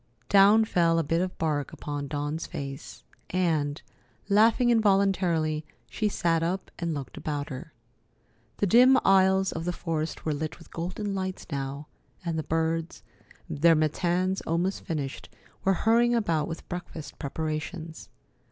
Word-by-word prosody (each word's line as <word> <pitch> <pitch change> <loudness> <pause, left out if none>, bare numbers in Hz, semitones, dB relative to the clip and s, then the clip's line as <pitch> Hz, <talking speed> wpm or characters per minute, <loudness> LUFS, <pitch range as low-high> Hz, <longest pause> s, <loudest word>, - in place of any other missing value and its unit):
Down 205 +3 +6
fell 170 -5 +2
a 165 - +2
bit 165 +3 0
of 185 0 -3
bark 150 -3 -1
upon 145 -1 -5
Dawn's 145 +3 -3
face, 140 +1 -7 0.3
and, 160 -5 0 0.5
laughing 225 +4 +4
involuntarily, 190 -8 +2 0.3
she 215 - 0
sat 165 -4 +1
up 180 +3 -2
and 170 -2 -2
looked 140 -3 -7
about 145 -1 -3
her. 150 +4 -7 0.9
The - - +1
dim 250 +6 +6
aisles 190 0 +4
of 165 - -4
the 180 - -1
forest 165 -2 -3
were 155 - +1
lit 155 +1 -4
with 165 - -17
golden 185 +5 -3
lights 190 -1 -4
now, 140 +1 -4 0.4
and 170 -1 -1
the 160 - 0
birds, 165 +1 -2 0.4
their 165 +3 +4
matins 175 +4 +1
almost 175 +4 0
finished, 145 -5 -4 0.3
were 195 - +3
hurrying 240 +2 +4
about 165 -9 +1
with 165 0 -7
breakfast 175 -3 -7
preparations. 160 +3 -5
165 Hz, 145 wpm, -27 LUFS, 155-190 Hz, 0.9 s, Down